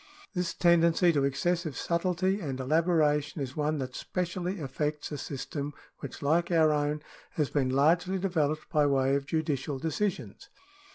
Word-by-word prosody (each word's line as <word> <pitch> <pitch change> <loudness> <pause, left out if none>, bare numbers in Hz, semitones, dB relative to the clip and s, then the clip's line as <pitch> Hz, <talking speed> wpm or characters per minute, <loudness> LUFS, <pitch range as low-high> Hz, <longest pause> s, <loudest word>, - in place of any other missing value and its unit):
This 180 -3 -2
tendency 170 0 +4
to 140 -2 +2
excessive 160 +2 0
subtilty 185 +3 0
and 135 -6 -3
elabora 155 +1 +3
tion 150 - -9
is 135 -2 -4
one 150 0 0
that 130 -2 -4
specially 180 +1 -3
affects 150 +1 -3
a 150 - -3
system 140 +2 -5 0.3
which, - - -8
like 165 +4 +2
our 160 -3 +4
own, 150 0 -1 0.3
has 150 -3 -1
been 135 -3 +1
largely 165 +8 +3
developed 155 -5 -1
by 150 -3 +3
way 135 -1 +2
of 140 0 -2
judicial 150 -3 -1
decisions. 170 +7 -3
155 Hz, 155 wpm, -29 LUFS, 145-175 Hz, 0.3 s, tendency